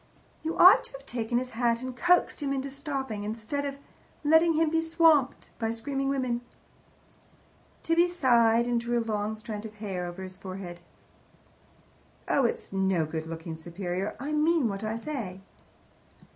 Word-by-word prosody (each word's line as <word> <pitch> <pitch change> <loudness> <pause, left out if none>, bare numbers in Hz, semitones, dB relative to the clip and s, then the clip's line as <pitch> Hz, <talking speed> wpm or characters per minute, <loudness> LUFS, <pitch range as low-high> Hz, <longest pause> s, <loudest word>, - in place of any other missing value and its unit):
You 320 +1 -3
ought 370 +3 +8
to - - -10
have 270 0 -10
taken 240 -1 -2
his 255 +1 -2
hat 235 +1 0
and 255 -1 -5
coaxed 350 +3 +2
him 280 -1 -1
into 275 0 -2
stopping, 270 -6 -4
instead 225 +7 -3
of 280 -1 -3 0.5
letting 320 +2 +5
him 315 0 +2
be 325 0 +2
swamped 325 -4 +3
by 225 -1 0
screaming 270 +4 -2
women." 255 -3 -1 1.4
Tibby 335 +2 +3
sighed, 235 -9 +3
and 240 -1 +1
drew 240 0 -1
a 230 - 0
long 215 -1 -2
strand 215 -1 -6
of 215 -1 -9
hair 190 -4 -4
over 175 +2 -7
his 185 0 -9
forehead. 185 -2 -8 1.5
"Oh, 275 - +3
it's 230 - -2
no 190 -4 +1
good 160 +1 -5
looking 165 0 -6
superior. 175 +4 -4
I 280 +4 -4
mean 305 -2 +3
what 200 0 -4
I 220 +1 -2
say." 230 -8 -5
235 Hz, 160 wpm, -28 LUFS, 205-280 Hz, 1.5 s, ought